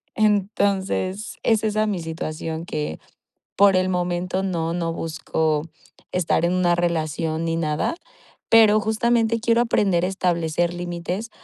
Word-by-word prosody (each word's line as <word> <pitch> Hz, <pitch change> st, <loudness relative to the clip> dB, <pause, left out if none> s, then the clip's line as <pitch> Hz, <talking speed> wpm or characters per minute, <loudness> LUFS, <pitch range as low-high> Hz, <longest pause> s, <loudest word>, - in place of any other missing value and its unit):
Entonces, 200 Hz, -1 st, 0 dB
es 225 Hz, -2 st, +2 dB
esa 215 Hz, 0 st, +1 dB
mi 200 Hz, -4 st, -1 dB
situación 160 Hz, 0 st, -5 dB
que 150 Hz, -, -4 dB, 0.6 s
por 200 Hz, -1 st, +5 dB
el 185 Hz, 0 st, +2 dB
momento 180 Hz, +1 st, -1 dB
no, 170 Hz, -3 st, -2 dB
no 170 Hz, -1 st, -1 dB
busco 160 Hz, -2 st, -1 dB, 0.5 s
estar 175 Hz, -2 st, +1 dB
en 175 Hz, -, +2 dB
una 180 Hz, -1 st, +3 dB
relación 165 Hz, -1 st, -1 dB
ni 165 Hz, 0 st, 0 dB
nada, 155 Hz, -, -1 dB, 0.6 s
pero 215 Hz, -2 st, +6 dB
justamente 230 Hz, +1 st, +1 dB
quiero 230 Hz, +1 st, +3 dB
aprender 195 Hz, -7 st, +1 dB
a -, -, +1 dB
establecer 175 Hz, -2 st, 0 dB
límites 175 Hz, +5 st, -4 dB
180 Hz, 130 wpm, -23 LUFS, 165-205 Hz, 0.6 s, pero